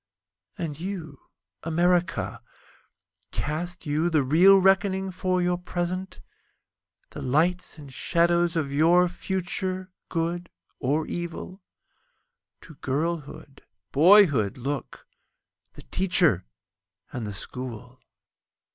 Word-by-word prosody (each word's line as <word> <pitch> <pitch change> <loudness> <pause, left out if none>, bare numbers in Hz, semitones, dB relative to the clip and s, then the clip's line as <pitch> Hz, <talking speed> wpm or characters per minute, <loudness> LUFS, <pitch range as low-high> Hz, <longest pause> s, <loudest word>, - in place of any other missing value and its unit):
And 155 -3 -4
you, 170 -6 -7 0.3
America, 175 +1 0 0.9
Cast 175 +4 -4
you 155 +3 +1
the 155 -4 +2
real 175 +9 +6
reckoning 190 0 +2
for 185 0 0
your 175 0 0
present? 180 +1 -4 0.9
The - - -7
lights 165 +7 0
and 140 -3 -11
shadows 170 +2 +2
of 145 -4 -1
your 170 +5 +5
future—good 180 -2 -3 0.3
or 150 +4 0
evil? 175 +3 -6 1.0
To 160 - -13
girlhood, 145 -1 -3 0.3
boyhood 150 - +5
look—the 135 +1 -9
Teacher 175 - +2 0.7
and 120 -4 -4
the 105 - -5
School. 125 +3 -7
170 Hz, 90 wpm, -26 LUFS, 145-180 Hz, 1.0 s, real